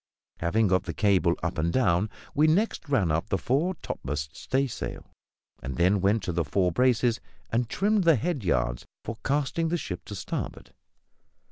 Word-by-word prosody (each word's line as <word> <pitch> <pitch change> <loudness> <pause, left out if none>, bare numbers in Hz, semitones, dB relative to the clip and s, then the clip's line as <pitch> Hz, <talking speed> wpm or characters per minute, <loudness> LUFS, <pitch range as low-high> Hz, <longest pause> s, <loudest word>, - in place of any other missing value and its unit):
Having 100 +5 +2
got 95 0 +2
the - - -5
cable 95 -5 +3
"up 85 -2 -2
and 85 +2 +1
down," 100 -4 +2 0.2
we 150 +2 +4
next 170 -1 +1
ran 105 - +2
up 80 +2 -1
the 95 - +1
fore 145 - 0
topmast 70 +1 -4
staysail, 135 -1 -2 0.6
and 65 0 -5
then 95 +6 +3
went 100 +2 +2
to 90 - -2
the 85 0 0
fore 90 +4 +1
braces 120 +1 +2 0.3
and 115 0 0
trimmed 205 +4 +2
the 165 -2 +6
head 145 - -2
yards - - 0 0.2
for 115 0 -5
casting 150 +4 0
the 175 - +1
ship 90 - -5
to - - -7
starboard. - - -5
110 Hz, 170 wpm, -27 LUFS, 85-140 Hz, 0.6 s, the